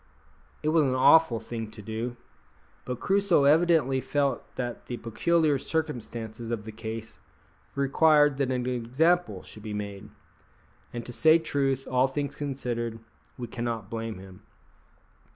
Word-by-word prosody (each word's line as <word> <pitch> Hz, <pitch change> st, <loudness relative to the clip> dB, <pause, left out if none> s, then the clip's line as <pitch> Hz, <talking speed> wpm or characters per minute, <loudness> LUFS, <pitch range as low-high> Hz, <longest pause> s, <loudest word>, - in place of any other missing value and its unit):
It 155 Hz, -, +1 dB
was 160 Hz, 0 st, +4 dB
an 130 Hz, -2 st, +1 dB
awful 130 Hz, -2 st, +5 dB
thing 115 Hz, -2 st, -6 dB
to 110 Hz, -, -13 dB
do, 115 Hz, +3 st, -4 dB, 0.7 s
but 125 Hz, -1 st, -4 dB
Crusoe 195 Hz, -6 st, +3 dB
evidently 150 Hz, -3 st, +4 dB
felt 140 Hz, -3 st, 0 dB
that 120 Hz, -2 st, -5 dB
the 120 Hz, -, -4 dB
peculiar 145 Hz, +6 st, +1 dB
circumstances 120 Hz, -8 st, -4 dB
of 115 Hz, -3 st, -3 dB
the 110 Hz, -, -6 dB
case 110 Hz, 0 st, -7 dB, 0.6 s
required 145 Hz, +1 st, +4 dB
that 140 Hz, -2 st, 0 dB
an 125 Hz, -1 st, -1 dB
example 130 Hz, +9 st, +1 dB
should 105 Hz, -, -10 dB
be 105 Hz, -1 st, -5 dB
made; 100 Hz, 0 st, -6 dB, 0.8 s
and 120 Hz, -1 st, -6 dB
to 125 Hz, -, -7 dB
say 160 Hz, +5 st, +6 dB
truth, 135 Hz, -4 st, -1 dB
all 130 Hz, +1 st, +3 dB
things 140 Hz, +1 st, -3 dB
considered, 120 Hz, -5 st, -3 dB, 0.4 s
we 125 Hz, -, -4 dB
cannot 115 Hz, -2 st, -4 dB
blame 115 Hz, -2 st, -4 dB
him. 95 Hz, 0 st, -12 dB
125 Hz, 140 wpm, -27 LUFS, 115-145 Hz, 0.8 s, say